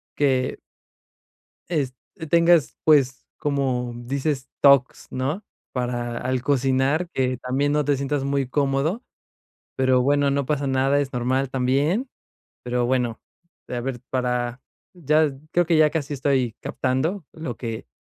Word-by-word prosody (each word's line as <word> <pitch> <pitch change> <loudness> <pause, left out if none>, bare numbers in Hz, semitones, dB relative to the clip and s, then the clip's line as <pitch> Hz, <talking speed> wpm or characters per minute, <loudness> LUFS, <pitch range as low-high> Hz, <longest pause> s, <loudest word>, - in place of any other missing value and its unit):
que 130 -3 +1 1.1
es 140 -7 -1 0.2
que 160 - -7
tengas 170 -1 +4
pues, 135 -4 +3
como 135 -4 -1
dices 135 +3 -2
talks, 140 -2 +4
¿no?, 140 +10 -2 0.3
para 120 -1 -2
al 130 0 -1
cocinar 135 +4 +1
que 130 -5 0
también 130 +4 0
no 150 0 +2
te 145 0 +2
sientas 140 +1 -1
muy 140 -1 0
cómodo. 145 - 0 0.7
Pero 130 -1 +3
bueno, 140 +1 +2
no 140 0 0
pasa 145 -2 0
nada. 135 +1 +2
es 140 -2 -2
normal 130 +2 0
también, 140 - +1 0.5
pero 125 0 0
bueno, 125 -3 0 0.5
a 125 - -3
ver 125 -1 -4
para, 125 -1 -1 0.3
ya 155 -2 +2 0.2
creo 175 0 +3
que 165 0 +3
ya 155 -1 +6
casi 150 -3 -3
estoy 130 -4 +1
captando 155 +9 -1
lo 155 -8 -6
que 115 - -5
135 Hz, 135 wpm, -23 LUFS, 125-145 Hz, 1.1 s, ya